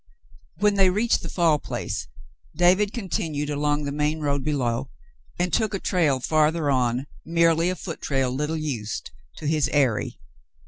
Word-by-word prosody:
When 205 +3 +3
they 190 -1 +6
reached 215 +5 +1
the 165 - -6
Fall 165 -4 +2
Place, - - -4 0.5
David 185 +5 +4
continued 160 -9 -2
along 145 0 0
the 140 - -3
main 150 +2 0
road 140 -2 -1
below 130 -3 -1 0.5
and 175 -2 -1
took 220 0 +1
a - - -2
trail 160 -10 +1
farther 155 +1 +2
on, 125 0 +1 0.2
merely 165 +1 +3
a 185 - -1
foot 170 -2 -7
trail 135 -3 0
little 150 +5 -2
used, 125 -9 -4 0.2
to - - -9
his 150 -2 +1
eyrie. 130 -7 +1
150 Hz, 155 wpm, -24 LUFS, 140-170 Hz, 0.5 s, they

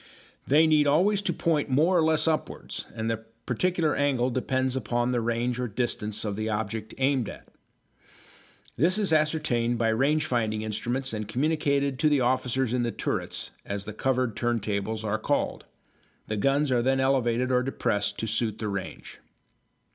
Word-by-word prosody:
They 150 +4 +5
need 155 -2 +4
always 190 +8 +3
to 190 - 0
point 160 -3 0
more 155 +8 +3
or 170 - +5
less 160 0 +2
upwards, 160 -1 -2
and 110 -1 -3
the 115 -1 -2 0.2
particular 165 +4 +1
angle 130 -3 +1
depends 130 +1 0
upon 120 0 0
the 120 -1 +1
range 120 +2 -1
or 125 - -1
distance 110 -2 -2
of 105 -2 -2
the 110 +1 -2
object 110 0 -3
aimed 130 -4 +1
at. - - -11 1.3
This 175 - +3
is 200 -6 +1
ascertained 150 -7 +1
by 115 -1 +1
range 140 +7 +2
finding 110 -4 -1
instruments 120 +4 -2
and 105 -1 -4
communicated 140 +1 0
to 155 - +4
the 145 -3 +3
officers 125 0 +1
in 125 - +1
the 120 - 0
turrets, - - -3
as 100 0 -4
the 110 - -6
covered 125 -1 0
turntables 110 -2 -1
are 110 0 -1
called. - - -1 0.6
The 110 - -3
guns 140 +5 +2
are 125 -2 +3
then 135 +2 +2
elevated 130 -2 +1
or 125 0 +3
depressed 105 -5 -1
to 110 - -2
suit 110 0 0
the 110 - -3
range. 100 -1 -6
125 Hz, 170 wpm, -27 LUFS, 110-145 Hz, 1.3 s, They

